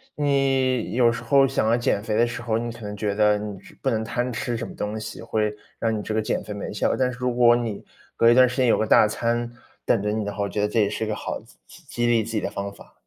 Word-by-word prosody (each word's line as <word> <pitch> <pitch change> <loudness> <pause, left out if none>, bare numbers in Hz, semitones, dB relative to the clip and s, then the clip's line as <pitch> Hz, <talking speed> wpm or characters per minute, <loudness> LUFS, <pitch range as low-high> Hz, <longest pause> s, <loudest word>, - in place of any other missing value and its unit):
你 135 -4 +1
有 120 -1 +4
时 115 +1 -5
候 135 +2 +4
想 130 -4 0
要 115 - +4
减 120 -4 0
肥 110 -1 -2
的 120 +2 +3
时 120 +1 -5
候， 115 -2 0
你 120 0 -4
可 115 - -12
能 105 -1 -6
觉 105 0 -2
得 105 0 +4
你 105 -2 -6
是 - - -16
不 135 - +1
能 110 -3 0
贪 120 +3 -2
吃 120 +1 -3
什 115 - -4
么 - - -11
东 105 +1 -3
西， 110 0 -7
会 105 -2 -1 0.2
让 115 -1 0
你 - - -3
这 110 - -4
个 110 - +1
减 110 - -2
肥 105 - -6
没 100 - -5
效。 105 - 0
但 125 -1 +1
是 125 - -9
如 125 -1 0
果 120 -1 +6
你 115 -4 -3 0.3
隔 115 - +5
一 120 - +6
段 130 0 +7
时 125 - -4
间 130 -2 +3
有 - - +4
个 110 - +1
大 105 - +6
餐 120 +2 -1 0.3
等 115 - +2
着 105 - 0
你 110 0 -1
的 105 - -3
话， 100 0 -3
我 100 - -2
觉 105 +3 -2
得 105 - +2
这 110 +2 0
也 100 - +2
是 105 - -3
一 - - -5
个 105 - -2
好 - - -4
激 - - -21
激 - - -16
激 120 - -2
励 115 -2 +3
自 115 - -7
己 110 - 0
的 - - -3
方 100 0 -4
法。 - - -16
115 Hz, 330 characters per minute, -24 LUFS, 105-120 Hz, 0.3 s, 段